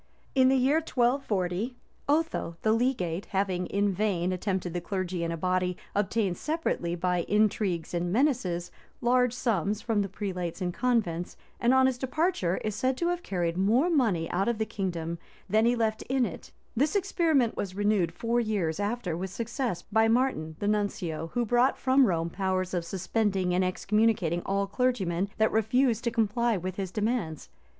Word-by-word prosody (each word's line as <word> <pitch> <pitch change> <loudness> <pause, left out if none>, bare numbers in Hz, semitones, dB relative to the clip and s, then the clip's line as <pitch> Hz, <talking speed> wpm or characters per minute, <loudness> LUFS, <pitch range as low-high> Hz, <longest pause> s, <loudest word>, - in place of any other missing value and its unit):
In 260 -1 +5
the 265 - +4
year 265 +4 +3
1240, 240 - 0 0.3
Otho 295 - 0
the 215 - +3
legate, 215 -8 0
having 190 -2 -1
in 200 0 +1
vain 185 -3 0
attempted 185 -2 -2
the 175 - -2
clergy 185 -1 -3
in 165 - -1
a 165 - -3
body, 180 +1 0 0.2
obtained 200 -2 0
separately, 305 - -1
by 180 0 0
intrigues 205 -5 +1
and 175 0 -1
menaces, 200 - 0 0.3
large 250 0 +3
sums 215 -5 0
from 220 -2 0
the 200 - -2
prelates 185 -4 -4
and 180 -2 -2
convents, 200 -8 0 0.2
and 240 - +3
on 260 0 +5
his 260 -2 +1
departure 265 - 0
is 215 - -1
said 255 +3 0
to 340 +3 0
have 350 0 -1
carried 175 - -2
more 240 - +3
money 215 - +2
out 190 +4 0
of 235 -2 +1
the 220 - 0
kingdom 170 -5 -3 0.3
than 215 +3 +3
he 240 - +3
left 220 -2 0
in 265 -1 +2
it - - -8 0.2
This 290 - +1
experiment 320 - +2
was 185 -2 -4
renewed 205 -4 +1
four 230 +7 0
years 205 -8 -1
after 205 -4 -2
with 190 +3 -4
success 230 - -3
by 220 +1 +2
Martin 225 -10 +1
the 205 - -2
nuncio, 190 -6 -1
who 240 -1 +1
brought 245 +4 +3
from 260 0 +4
Rome 170 -2 -1
powers 185 0 -1
of 175 -2 0
suspending 190 0 0
and 185 +1 +2
excommunicating 185 -2 +1
all 200 +1 +1
clergymen 195 -5 0
that 220 0 +3
refused 230 +1 +2
to - - +3
comply 230 0 +1
with 185 +1 -5
his 195 -2 -3
demands. 205 - -2
205 Hz, 175 wpm, -28 LUFS, 180-240 Hz, 0.3 s, In